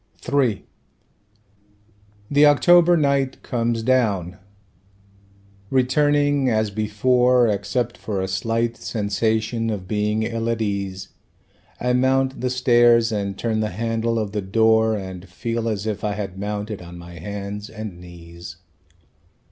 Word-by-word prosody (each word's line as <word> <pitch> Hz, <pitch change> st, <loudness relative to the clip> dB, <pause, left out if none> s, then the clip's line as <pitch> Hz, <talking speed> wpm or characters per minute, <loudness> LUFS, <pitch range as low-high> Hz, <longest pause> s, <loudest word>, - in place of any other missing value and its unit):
III 125 Hz, -8 st, +1 dB, 1.7 s
The 145 Hz, +1 st, +6 dB
October 175 Hz, +4 st, +5 dB
night 140 Hz, -3 st, 0 dB
comes 115 Hz, -1 st, -1 dB
down; 100 Hz, -8 st, +1 dB, 1.3 s
returning 145 Hz, +1 st, +2 dB
as 110 Hz, -2 st, 0 dB
before 125 Hz, +4 st, +2 dB
Except 110 Hz, +4 st, -2 dB
for 100 Hz, -3 st, -3 dB
a 95 Hz, -, -2 dB
slight 115 Hz, +5 st, -1 dB
sensation 110 Hz, +2 st, -1 dB
of 100 Hz, -4 st, -4 dB
being 105 Hz, +2 st, 0 dB
ill 115 Hz, 0 st, -2 dB
at 115 Hz, -1 st, -1 dB
ease 100 Hz, -3 st, -3 dB, 0.7 s
I 125 Hz, 0 st, 0 dB
mount 130 Hz, +1 st, +1 dB
the 125 Hz, -, 0 dB
stairs 120 Hz, -2 st, +4 dB
and 100 Hz, -2 st, -3 dB
turn 110 Hz, 0 st, -1 dB
the 110 Hz, 0 st, -1 dB
handle 115 Hz, +3 st, -1 dB
of 105 Hz, -3 st, -2 dB
the 105 Hz, 0 st, -2 dB
door 110 Hz, +2 st, +3 dB
And 95 Hz, -2 st, -8 dB
feel 115 Hz, +4 st, -3 dB
as 105 Hz, -2 st, -3 dB
if 110 Hz, -2 st, -3 dB
I 105 Hz, -1 st, 0 dB
had 100 Hz, -3 st, -5 dB
mounted 105 Hz, 0 st, -4 dB
on 85 Hz, 0 st, -10 dB
my 85 Hz, 0 st, -11 dB
hands 100 Hz, +3 st, -6 dB
and 110 Hz, -5 st, -8 dB
knees. 85 Hz, 0 st, -11 dB
110 Hz, 130 wpm, -22 LUFS, 100-120 Hz, 1.7 s, The